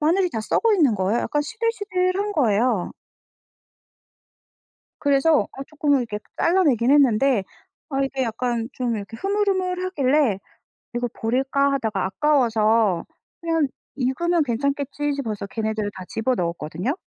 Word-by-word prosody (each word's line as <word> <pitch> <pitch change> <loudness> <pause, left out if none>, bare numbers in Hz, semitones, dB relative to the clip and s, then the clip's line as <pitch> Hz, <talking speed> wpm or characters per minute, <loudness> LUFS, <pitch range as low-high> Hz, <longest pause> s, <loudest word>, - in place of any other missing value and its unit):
마늘이 350 +4 +2
다 225 - -3
썩어 435 - +2
있는 290 - +3
거예요. 200 +4 0
약간 295 - 0
시들시들한 410 -1 -1
거예요. 230 - +1 2.1
그래서 285 +2 +4
어 270 - -7
쪼끔은 295 -2 +1
이렇게 215 -4 -4 0.2
잘라내긴 285 - +3
했는데 270 -4 +4 0.5
아 270 -1 -1
이게 270 0 -2
약간 230 0 -2
좀 245 -3 -1
이렇게 205 +2 -7
흐물흐물하길래 365 - +1 0.6
'이거 240 0 0
버릴까?' 270 +4 +1
하다가 220 -7 -1
아까워서 225 - +2 0.4
그냥 330 -3 +1 0.3
'이거면 315 +6 +1
괜찮겠지.' 280 +3 -1
싶어서 220 -7 -4
걔네들을 220 -1 -2
다 185 - -7
집어넣었거든요. 180 - -2
270 Hz, 315 characters per minute, -23 LUFS, 225-315 Hz, 2.1 s, 그래서